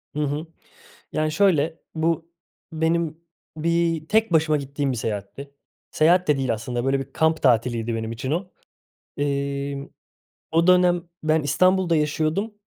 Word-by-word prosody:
Hı - - -2
hı. 150 +3 -3 0.7
Yani, 155 0 0
şöyle 165 -3 +2 0.2
bu 165 +1 -1 0.4
benim 160 0 0 0.4
bir 165 0 0
tek 220 -2 +2
başıma 155 -1 +3
gittiğim 140 -1 -2
bir - - -3
seyahatti. 110 +5 -5 0.4
Seyahat 175 +3 +3
de 150 - +4
değil 130 -3 0
aslında, 120 +2 -4
böyle, 135 +1 +2
bir 135 - -8
kamp 160 0 +1
tatiliydi 120 -2 +2
benim 110 0 -3
için 130 +3 -4
o. 180 +4 -2 0.7
Emm, 140 0 -2 0.6
o 165 +2 +3
dönem 180 -1 +4 0.2
ben 155 0 +2
İstanbul'da 185 +3 +3
yaşıyordum, 155 +7 0
155 Hz, 135 wpm, -23 LUFS, 140-170 Hz, 0.7 s, de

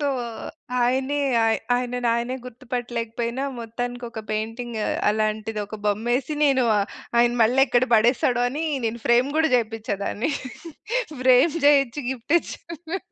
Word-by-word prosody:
తో 290 - 0 0.8
ఆయనే 265 +4 +1 0.6
ఆయనని 245 0 -1
ఆయనే 240 +2 -2
గుర్తుపట్టలేకపోయినా 240 0 -4
మొత్తానికి 245 +2 -5
ఒక 220 - -6
పెయింటింగ్ 225 +2 -3 0.3
అలాంటిది 215 0 -1
ఒక 215 - -7
బొమ్మేసి 240 +7 0
నేను 265 -3 +3 0.5
ఆయన 240 0 +5
మళ్ళెక్కడ 250 +1 +4
పడేస్తాడో 240 +2 +3
అని 295 +6 -3 0.2
నేను 230 +1 -2
ఫ్రేమ్ 245 +4 +4
కూడా 320 -3 +3
చేపిచ్చాదాన్ని 220 +1 -2 0.9
ఫ్రేమ్ 255 +5 +5
చేయించి 280 -1 +3
గిఫ్ట్ 265 +4 -2
ఇచ్చాను. 335 +3 -7
245 Hz, 110 wpm, -24 LUFS, 225-265 Hz, 0.9 s, ఆయన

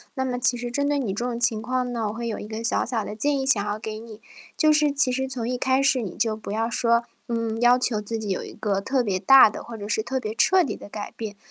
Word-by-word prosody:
那 265 - -1
么 250 -1 -2
其 245 0 +1
实 240 0 -4
针 285 +4 0
对 290 - +1
你 225 -8 -2
这 220 - -3
种 240 -1 -3
情 230 -3 +1
况 250 +1 -2
呢， 225 -3 -1
我 - - -5
会 235 +1 -4
有 225 - -3
一 - - -7
个 220 +1 -6
小 230 - 0
小 225 -4 -2
的 210 - -6
建 285 +5 0
议 265 - -2
想 220 -7 +3
要 210 +1 -3
给 215 0 -6
你， 220 -1 -11 0.4
就 310 -1 +4
是 300 -1 +3
其 275 -2 +1
实 265 +1 -2
从 245 -3 -4
一 250 +1 -1
开 260 +2 +2
始 275 -2 +3
你 195 -6 -6
就 220 -2 +1
不 215 -2 -8
要 225 +2 -1
说， 235 0 +2 0.3
嗯， 230 -1 -2
要 245 +1 +5
求 225 -4 -1
自 225 +2 -4
己 215 - -5
有 190 - -2
一 - - -9
个 200 -2 -2
特 260 +5 0
别 200 -6 -1
大 260 +6 +7
的， - - -8
或 230 -1 -8
者 205 - -7
是 220 +1 0
特 265 +3 -2
别 220 -2 -5
彻 375 +8 +4
底 - - -3
的 - - -12
改 205 0 -7
变。 210 -3 -6
235 Hz, 320 characters per minute, -24 LUFS, 215-255 Hz, 0.4 s, 大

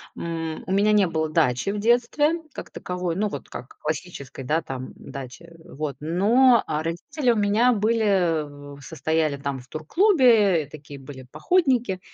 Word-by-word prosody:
М, 165 -1 -5
у 190 - -3
меня 205 +2 +3
не 205 -3 +4
было 160 -1 -1
дачи 150 -1 +1
в 205 - -3
детстве 245 +9 +2
как - - -8
таковой. 180 -2 -4
Ну, 210 +2 0
вот 145 -8 -7
как 125 - -10
классической, 150 -4 -5
да, 155 +6 0
там, 130 -2 -6
м, - - -13
дачи. 135 +3 -10
Вот. 150 -1 -5
Но, 220 - +4
а, 155 0 -2
родители 240 - -1
у - - +1
меня 215 +4 +3
были 175 -10 0
в - - -15
состояли 160 -2 -1
там 140 -1 -4
в 125 - -15
турклубе. 215 - +3
И - - -21
такие 145 -1 -11
были 130 -1 -11
походники. 245 - +1
170 Hz, 170 wpm, -24 LUFS, 150-215 Hz, -, не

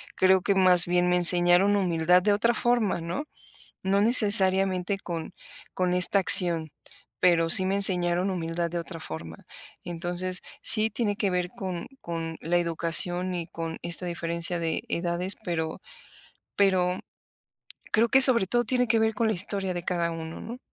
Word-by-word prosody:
Creo 190 0 +2
que 195 +1 -1
más 180 -2 +4
bien 180 0 0
me 180 - +1
enseñaron 175 +3 +4
humildad 180 -2 +1
de 205 - +1
otra 230 +4 0
forma, 240 -6 -1
¿no? 170 - -5 0.6
No 195 +1 0
necesariamente 195 -4 +3
con 170 -2 -8 0.4
con 180 -1 -2
esta 180 +2 +3
acción, 170 -4 +3 0.5
pero 165 -2 +1
sí 185 - +8
me 195 +1 -1
enseñaron 180 -2 +3
humildad 170 -1 -4
de 175 - -5
otra 170 0 -9
forma. 80 - -10 0.4
Entonces, 175 +1 -4 0.2
sí 220 0 +1
tiene 220 -4 -3
que 200 -2 -2
ver 180 -1 -3
con 185 -3 -7
con 165 -1 -7
la 175 +2 -2
educación 175 +2 +2
y 170 - -6
con 165 -1 -7
esta 175 +1 -1
diferencia 170 0 -4
de 165 -1 -4
edades, 175 +2 -2
pero 160 -4 -5 0.8
pero 185 -2 0 0.9
creo 225 +2 +1
que, 265 - +3
sobre 250 -6 +8
todo, 240 +4 -1
tiene 250 +1 -1
que 225 0 +1
ver 220 0 0
con 225 +2 -2
la 220 - -1
historia 190 0 -2
de 175 -1 -7
cada 170 -1 -3
uno, 160 0 -8
¿no? 240 +2 -10
180 Hz, 160 wpm, -24 LUFS, 170-200 Hz, 0.9 s, sí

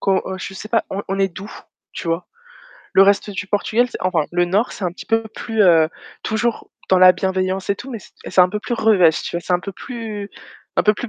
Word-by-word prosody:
Co 195 - +1
heu 190 - -4
je - - -11
sais 215 - -8
pas, 230 0 +1
on 200 - -3
on 195 +1 -2
est 195 0 +2
doux, 195 +3 -9 0.4
tu 170 - -6
vois? 165 +2 -1 0.7
Le 190 - +8
reste 200 +1 +3
du 200 0 -5
Portugal, 220 +5 +1
c - - -6
enfin 180 -4 +1
le 175 0 +2
nord, 200 +7 0
c'est 195 - -6
un 175 - -1
petit - - -11
peu 225 0 +2
plus, 225 -2 0
heu, 165 -4 +5 0.3
toujours 220 +1 -2 0.2
dans 190 - +4
la 185 0 +8
bienveillance 190 +1 -1
et 200 - +1
tout, 245 +5 -9
mais 235 - -5
c - - -16 0.2
c'est - - +4
un 180 - +6
peu 210 +3 -4
plus 240 - -3
revêche, 190 -8 +4
tu - - -4
vois, - - -2
c'est 180 - -3
un 175 - +1
peu 200 - -6
plus 220 -3 -7 0.5
un - - +4
peu 210 - +4
plus 245 - -6
195 Hz, 255 wpm, -20 LUFS, 185-220 Hz, 0.7 s, Le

